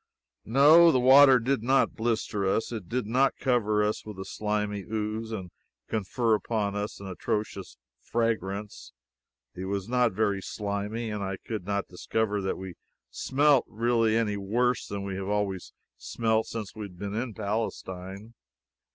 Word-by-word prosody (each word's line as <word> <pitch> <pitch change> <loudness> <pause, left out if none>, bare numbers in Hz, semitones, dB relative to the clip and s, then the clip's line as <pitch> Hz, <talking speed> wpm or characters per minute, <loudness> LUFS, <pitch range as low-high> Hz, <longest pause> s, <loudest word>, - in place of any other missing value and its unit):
No, 150 +8 +7
the 130 - +3
water 135 +1 +8
did 125 +1 0
not 130 +4 +2
blister 110 -3 -1
us; 95 +5 0
it 105 -7 -6
did 125 -2 -1
not 130 +5 +2
cover 110 -5 +1
us 105 +1 -1
with 105 -3 -9
a 95 - -6
slimy 105 -1 -2
ooze 110 +2 -3
and 95 -5 -5 0.4
confer 110 +2 0
upon 105 -1 -1
us 105 +1 -4
an 100 - -9
atrocious 95 +1 -4 0.2
fragrance; 105 - -2 0.6
it 95 - -6
was 100 0 -3
not 125 -1 +2
very 100 -1 0
slimy; 105 +3 -3
and 105 -1 -4
I 95 0 -3
could 110 -3 -6
not 100 -1 -1
discover 105 +3 -1
that 95 - -2
we 95 -1 -7 0.4
smelt 140 -1 +3
really 115 0 +2
any 105 -3 0
worse 120 +5 0
than 100 -1 -4
we 95 -1 -4
have 95 0 -4
always 100 -3 -2 0.3
smelt 110 - 0
since 110 -4 -6
we 110 -1 -6
have 90 -2 -16
been 100 +2 -5
in 115 0 -3
Palestine. 100 -1 -4
105 Hz, 160 wpm, -28 LUFS, 100-115 Hz, 0.6 s, water